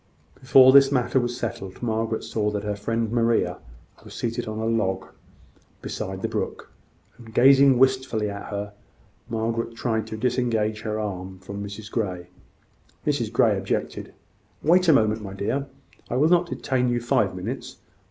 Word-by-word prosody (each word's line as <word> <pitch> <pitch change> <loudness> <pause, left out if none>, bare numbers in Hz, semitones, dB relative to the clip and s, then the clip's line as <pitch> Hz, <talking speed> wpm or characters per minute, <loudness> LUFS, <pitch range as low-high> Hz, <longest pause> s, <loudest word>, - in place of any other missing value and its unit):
Before 130 0 +6
this 135 0 +7
matter 130 0 +2
was 120 0 -2
settled, 95 -3 -6
Margaret 110 -1 -1
saw 105 -2 -1
that 105 -1 -3
her 105 0 -2
friend 115 +2 -2
Maria 115 -6 +1 0.4
was - - -12
seated 120 0 -3
on 110 0 -4
a 110 - -2
log 95 -4 0 0.8
beside 95 0 -5
the - - +1
brook, - - -4 0.5
and 115 -2 -12
gazing 135 +2 +6
wistfully 130 -4 +2
at 100 0 -6
her. 100 0 -5 0.6
Margaret 115 +1 -2
tried 110 -2 -1
to 110 - -6
disengage 115 -3 0
her 110 -1 -3
arm 95 -3 -5
from 100 +2 -7
Mrs 105 +2 -8
Grey; 90 -6 -3 0.8
Mrs 135 -7 0
Grey 115 -2 +3
objected. 95 0 -3 0.5
"Wait 180 +4 +4
a 160 - +7
moment, 110 -3 +2
my 100 -2 -7
dear. 120 +8 -2 0.4
I - - -2
will 150 +5 +3
not 175 0 +3
detain 125 -5 0
you 120 0 +1
five 120 -6 +1
minutes. 110 +9 -6
115 Hz, 160 wpm, -24 LUFS, 105-125 Hz, 0.8 s, this